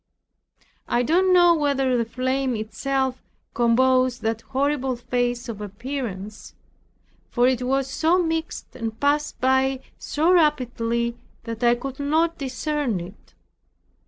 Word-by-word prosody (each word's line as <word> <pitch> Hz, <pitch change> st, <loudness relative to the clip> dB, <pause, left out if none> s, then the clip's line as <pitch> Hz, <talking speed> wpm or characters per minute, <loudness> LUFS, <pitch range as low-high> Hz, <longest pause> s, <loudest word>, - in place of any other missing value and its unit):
I 240 Hz, -, +1 dB
don't 360 Hz, +7 st, +3 dB
know 350 Hz, -1 st, +6 dB
whether 280 Hz, -4 st, +1 dB
the 235 Hz, -1 st, +1 dB
flame 260 Hz, +2 st, -1 dB
itself 260 Hz, +4 st, -2 dB, 0.3 s
composed 255 Hz, +1 st, +2 dB
that 225 Hz, 0 st, -1 dB
horrible 270 Hz, 0 st, -1 dB
face 245 Hz, 0 st, -2 dB
or 210 Hz, -3 st, -6 dB
appearance; 210 Hz, -, -6 dB, 0.7 s
for 245 Hz, -, +2 dB
it 255 Hz, -1 st, +1 dB
was 265 Hz, +1 st, 0 dB
so 320 Hz, +6 st, +2 dB
mixed 325 Hz, -2 st, -3 dB
and 225 Hz, -1 st, -5 dB
passed 295 Hz, +1 st, 0 dB
by 265 Hz, +1 st, +2 dB, 0.2 s
so 315 Hz, +4 st, +1 dB
rapidly, 240 Hz, -7 st, +1 dB, 0.2 s
that 230 Hz, 0 st, -6 dB
I 240 Hz, 0 st, +5 dB
could 265 Hz, +2 st, -7 dB
not 320 Hz, +4 st, +1 dB
discern 275 Hz, -4 st, -2 dB
it. 175 Hz, -, -12 dB
260 Hz, 125 wpm, -23 LUFS, 235-285 Hz, 0.7 s, know